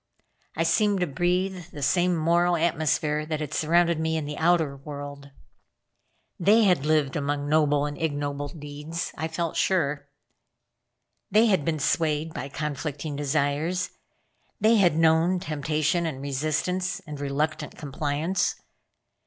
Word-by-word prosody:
I 165 Hz, -, +1 dB
seemed 205 Hz, +3 st, +2 dB
to -, -, +3 dB
breathe 180 Hz, +4 st, -1 dB
the 145 Hz, -4 st, -7 dB
same 175 Hz, +4 st, +2 dB
moral 170 Hz, +2 st, +2 dB
atmosphere 155 Hz, -2 st, +1 dB
that 155 Hz, -1 st, -2 dB
had 150 Hz, -3 st, -5 dB
surrounded 170 Hz, +1 st, +2 dB
me 160 Hz, 0 st, 0 dB
in 155 Hz, -, -3 dB
the 150 Hz, 0 st, -5 dB
outer 160 Hz, -4 st, +2 dB
world. 140 Hz, 0 st, -8 dB, 1.1 s
They 210 Hz, +6 st, +5 dB
had 180 Hz, -8 st, +3 dB
lived 150 Hz, -3 st, +2 dB
among 145 Hz, -1 st, -1 dB
noble 145 Hz, -1 st, +3 dB
and 145 Hz, 0 st, -4 dB
ignoble 145 Hz, -2 st, -2 dB
deeds 150 Hz, +2 st, -6 dB
I 160 Hz, -, -2 dB
felt 165 Hz, 0 st, -3 dB
sure. 145 Hz, -6 st, +1 dB, 1.2 s
They 215 Hz, +4 st, +5 dB
had 190 Hz, -9 st, +2 dB
been 160 Hz, +1 st, 0 dB
swayed 155 Hz, +1 st, 0 dB
by 135 Hz, +3 st, -5 dB
conflicting 145 Hz, 0 st, -4 dB
desires. 145 Hz, +5 st, 0 dB, 0.7 s
They 225 Hz, +1 st, +5 dB
had 175 Hz, -6 st, +4 dB
known 165 Hz, +3 st, +3 dB
temptation 155 Hz, +2 st, 0 dB
and 140 Hz, -5 st, -5 dB
resistance, 155 Hz, +7 st, -1 dB
and 150 Hz, -5 st, -8 dB
reluctant 150 Hz, +2 st, -2 dB
compliance. 150 Hz, +5 st, -1 dB
155 Hz, 135 wpm, -26 LUFS, 145-170 Hz, 1.2 s, They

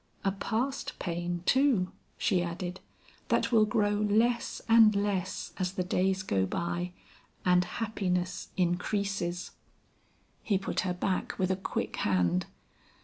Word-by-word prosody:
A 195 Hz, -, +2 dB
past 235 Hz, +7 st, -2 dB
pain, 175 Hz, 0 st, -3 dB
too," 260 Hz, -9 st, +3 dB, 0.3 s
she 190 Hz, -5 st, +2 dB
added, 175 Hz, +1 st, -4 dB, 0.5 s
"that -, -, +1 dB
will 220 Hz, -2 st, +6 dB
grow 210 Hz, -1 st, +1 dB, 0.2 s
less 235 Hz, +3 st, +2 dB
and 225 Hz, -2 st, +7 dB
less 200 Hz, -2 st, -1 dB
as 185 Hz, 0 st, -1 dB
the 185 Hz, -, -1 dB
days 190 Hz, +1 st, +1 dB
go 95 Hz, -, +1 dB
by 175 Hz, -, -2 dB, 0.5 s
and 180 Hz, 0 st, +5 dB
happiness 180 Hz, -3 st, -2 dB
increases." 180 Hz, 0 st, -1 dB, 0.9 s
He 205 Hz, -4 st, +1 dB
put 195 Hz, -, -2 dB
her 180 Hz, -, 0 dB
back 185 Hz, +1 st, -1 dB
with 185 Hz, 0 st, +1 dB
a -, -, +2 dB
quick 190 Hz, -, -3 dB
hand. 90 Hz, -2 st, +1 dB
185 Hz, 130 wpm, -30 LUFS, 175-210 Hz, 0.9 s, and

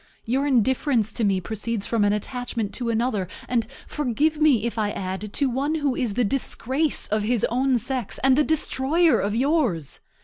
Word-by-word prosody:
Your 265 Hz, +5 st, 0 dB
indifference 255 Hz, -2 st, +2 dB
to 230 Hz, -, -1 dB
me 195 Hz, -2 st, +2 dB
proceeds 220 Hz, +2 st, -4 dB
from 230 Hz, -3 st, +1 dB
an 205 Hz, -, +3 dB
attachment 225 Hz, 0 st, -3 dB
to 240 Hz, -2 st, -3 dB
another, 225 Hz, -4 st, 0 dB, 0.2 s
and, 235 Hz, -3 st, 0 dB, 0.2 s
forgive 300 Hz, +3 st, 0 dB
me 265 Hz, -8 st, +4 dB
if 235 Hz, -, -2 dB
I 215 Hz, -2 st, 0 dB
add, 195 Hz, +1 st, -4 dB
to 280 Hz, -, +1 dB
one 275 Hz, +5 st, -1 dB
who 290 Hz, -4 st, 0 dB
is 240 Hz, -7 st, -1 dB
the 245 Hz, -, +2 dB
disgrace 270 Hz, +4 st, -1 dB
of 215 Hz, +1 st, +1 dB
his 225 Hz, +1 st, +1 dB
own 255 Hz, +1 st, +2 dB
sex 245 Hz, -1 st, -3 dB
and 265 Hz, -1 st, +5 dB
the 300 Hz, -, +4 dB
destroyer 315 Hz, +2 st, +2 dB
of 205 Hz, +2 st, -1 dB
yours. 250 Hz, -, 0 dB
245 Hz, 180 wpm, -24 LUFS, 215-275 Hz, 0.2 s, and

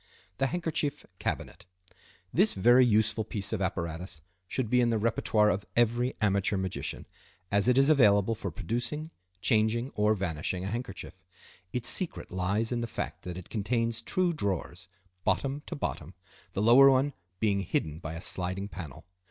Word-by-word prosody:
The 135 Hz, -, +2 dB
Handkerchief 160 Hz, -3 st, -2 dB
Cabinet.—This 90 Hz, -, -3 dB
very 120 Hz, +6 st, +6 dB
useful 110 Hz, -1 st, +3 dB
piece 100 Hz, -1 st, -3 dB
of 105 Hz, -, -1 dB
apparatus 85 Hz, -2 st, -3 dB, 0.3 s
should 130 Hz, +3 st, -2 dB
be 125 Hz, +3 st, +3 dB
in 120 Hz, -, +3 dB
the 115 Hz, -, +1 dB
repertoire 105 Hz, -1 st, +2 dB
of 100 Hz, +1 st, -3 dB
every 120 Hz, +2 st, +2 dB
amateur 100 Hz, -1 st, +1 dB
magician, 95 Hz, -1 st, -3 dB, 0.5 s
as 100 Hz, +2 st, +3 dB
it 125 Hz, 0 st, +4 dB
is 135 Hz, 0 st, +5 dB
available 110 Hz, -8 st, +5 dB
for 110 Hz, -, -4 dB
producing, 120 Hz, -, -3 dB, 0.3 s
changing, 115 Hz, +4 st, +2 dB
or 105 Hz, +1 st, +2 dB
vanishing 90 Hz, -1 st, -2 dB
a -, -, -2 dB
handkerchief. 120 Hz, +3 st, -6 dB, 0.5 s
Its 120 Hz, -1 st, -2 dB
secret 180 Hz, +6 st, -1 dB
lies 100 Hz, +6 st, 0 dB
in 120 Hz, -1 st, -1 dB
the 115 Hz, -, -2 dB
fact -, -, -5 dB
that 90 Hz, -1 st, -5 dB
it 90 Hz, -, -10 dB
contains 115 Hz, +1 st, -1 dB
two 180 Hz, +8 st, 0 dB
drawers, 95 Hz, -, -3 dB, 0.4 s
bottom 140 Hz, +1 st, 0 dB
to -, -, -4 dB
bottom, -, -, -4 dB, 0.4 s
the 100 Hz, -, -1 dB
lower 130 Hz, +5 st, +8 dB
one 135 Hz, +2 st, +2 dB, 0.3 s
being 100 Hz, -3 st, +2 dB
hidden 80 Hz, -4 st, -2 dB
by 80 Hz, -1 st, -6 dB
a 85 Hz, -, -7 dB
sliding 95 Hz, +2 st, -1 dB
panel. 80 Hz, -6 st, -9 dB
110 Hz, 160 wpm, -29 LUFS, 95-125 Hz, 0.5 s, lower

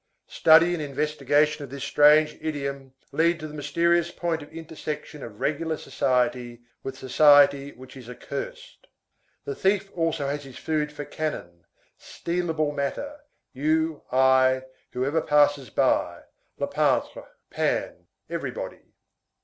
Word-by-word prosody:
Study 165 Hz, +2 st, +5 dB
and 170 Hz, -, -3 dB
investigation 150 Hz, +1 st, 0 dB
of 140 Hz, -, -9 dB
this 140 Hz, 0 st, -7 dB
strange 150 Hz, +2 st, +5 dB
idiom 140 Hz, -3 st, -5 dB, 0.2 s
lead 165 Hz, +3 st, +2 dB
to 155 Hz, -, -6 dB
the 150 Hz, -, -11 dB
mysterious 170 Hz, +4 st, +1 dB
point 170 Hz, -2 st, -3 dB
of 145 Hz, -, -12 dB
intersection 155 Hz, -2 st, -7 dB
of 105 Hz, -3 st, -10 dB
regular 160 Hz, +1 st, -1 dB
society 125 Hz, -3 st, -1 dB, 0.2 s
with 135 Hz, 0 st, -6 dB
society 140 Hz, +1 st, +5 dB
which 130 Hz, +1 st, -14 dB
is 125 Hz, -3 st, -11 dB
accursed. -, -, -8 dB, 0.6 s
The 425 Hz, -, -3 dB
thief 195 Hz, -, 0 dB
also 165 Hz, -3 st, -1 dB
has 145 Hz, +1 st, -3 dB
his 135 Hz, -2 st, -12 dB
food 150 Hz, -1 st, -2 dB
for 145 Hz, -1 st, -7 dB
cannon, 85 Hz, -, -5 dB, 0.3 s
stealable 165 Hz, -3 st, -2 dB
matter, 285 Hz, -, -4 dB, 0.3 s
you, 155 Hz, +3 st, 0 dB
I, 130 Hz, 0 st, +4 dB, 0.3 s
whoever 140 Hz, +6 st, 0 dB
passes 145 Hz, -4 st, +2 dB
by; -, -, 0 dB, 0.3 s
le -, -, -1 dB
pantre. -, -, 0 dB, 0.2 s
(Pan, -, -, -2 dB, 0.2 s
everybody.) -, -, -6 dB
150 Hz, 125 wpm, -25 LUFS, 135-160 Hz, 0.6 s, Study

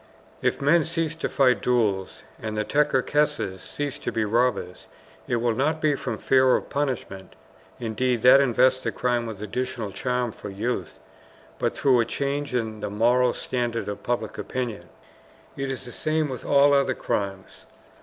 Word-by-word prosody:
If -, -, 0 dB
men 160 Hz, +3 st, +5 dB
cease 165 Hz, -1 st, -1 dB
to -, -, -2 dB
fight 125 Hz, -6 st, +3 dB
duels, 105 Hz, -6 st, 0 dB, 0.2 s
and 110 Hz, -1 st, -4 dB
the 105 Hz, -, 0 dB
Tcherkesses 145 Hz, -5 st, +1 dB
cease 145 Hz, +5 st, -5 dB
to -, -, -3 dB
be 110 Hz, -1 st, 0 dB
robbers, 115 Hz, -5 st, 0 dB, 0.4 s
it -, -, 0 dB
will 120 Hz, 0 st, +1 dB
not 150 Hz, +7 st, 0 dB
be 155 Hz, -1 st, +2 dB
from 140 Hz, -, -3 dB
fear 130 Hz, -1 st, +4 dB
of -, -, -4 dB
punishment 125 Hz, -9 st, -3 dB, 0.4 s
(indeed, 120 Hz, +1 st, -1 dB
that 130 Hz, +2 st, +8 dB
invests 130 Hz, 0 st, +3 dB
the -, -, -2 dB
crime 120 Hz, -1 st, -1 dB
with 105 Hz, -2 st, -7 dB
additional 115 Hz, -1 st, -3 dB
charm 125 Hz, +4 st, -1 dB
for 105 Hz, -, -9 dB
youth), 100 Hz, -2 st, -3 dB, 0.6 s
but -, -, -1 dB
through 130 Hz, -3 st, +4 dB
a 115 Hz, -, +3 dB
change 140 Hz, +2 st, -2 dB
in 110 Hz, -3 st, -2 dB
the 105 Hz, 0 st, -4 dB
moral 120 Hz, +4 st, +3 dB
standard 120 Hz, -2 st, -2 dB
of 105 Hz, -, -5 dB
public 120 Hz, -, -3 dB
opinion. 125 Hz, -5 st, -4 dB, 0.7 s
It 135 Hz, 0 st, -3 dB
is 135 Hz, -1 st, -5 dB
the 125 Hz, -, -9 dB
same 155 Hz, +3 st, -1 dB
with 130 Hz, -2 st, -6 dB
all 140 Hz, 0 st, +5 dB
other 140 Hz, -2 st, +2 dB
crimes. 95 Hz, -1 st, -4 dB
125 Hz, 165 wpm, -25 LUFS, 110-140 Hz, 0.7 s, that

